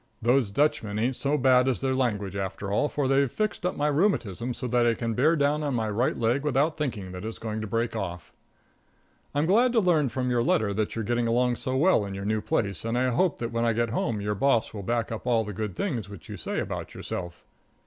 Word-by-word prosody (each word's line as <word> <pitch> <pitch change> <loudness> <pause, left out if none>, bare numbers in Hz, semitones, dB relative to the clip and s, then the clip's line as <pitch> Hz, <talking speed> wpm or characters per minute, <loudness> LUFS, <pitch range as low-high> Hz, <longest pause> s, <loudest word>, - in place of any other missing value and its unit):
Those 120 -1 +2
Dutchmen 105 -4 0
ain't 125 +4 0
so 145 +3 0
bad 130 -1 +4
as 130 - +1
their 135 -1 0
language, 105 -7 -1
after 95 0 -4
all, 145 +9 +2
for 145 -2 -1
they've 135 -1 +2
fixed 215 -4 -1
up 180 - -2
my 145 - 0
rheumatism 140 - +1
so 125 - -4
that 120 0 +2
I 115 - +3
can 115 -1 -2
bear 150 +9 +3
down 145 0 +1
on 145 -3 -1
my 110 -2 -1
right 115 +5 0
leg 120 +4 +1
without 150 +2 +1
thinking 115 -11 -3
that 90 +1 -7
it's 110 +1 -5
going 110 -1 -4
to 110 - -4
break 115 +2 -1
off. 90 -5 -5 1.0
I'm 145 +2 +2
glad 235 +8 +4
to 235 - +4
learn 165 - +3
from 125 +2 -2
your 120 -1 +2
letter 110 -3 +1
that 105 +1 -2
you're 115 -2 -2
getting 120 +1 0
along 120 +1 +2
so 130 0 -2
well 165 - +4
in 100 -1 -5
your 100 0 -5
new 110 +1 0
place, 100 -5 -1
and 115 +1 -1
I 130 0 +2
hope 175 +6 +1
that 115 -1 -4
when 115 0 0
I 115 -1 +2
get 115 0 0
home 115 -2 -1
your 105 +1 -1
boss 115 +2 +1
will 105 - -5
back 115 +3 -1
up 115 +2 -5
all 115 -2 +3
the 105 -1 -6
good 105 -2 -4
things 120 - -2
which 95 -6 -11
you - - -6
say - - -3
about - - -5
yourself. 85 -1 -6
120 Hz, 245 wpm, -27 LUFS, 105-135 Hz, 1.0 s, bad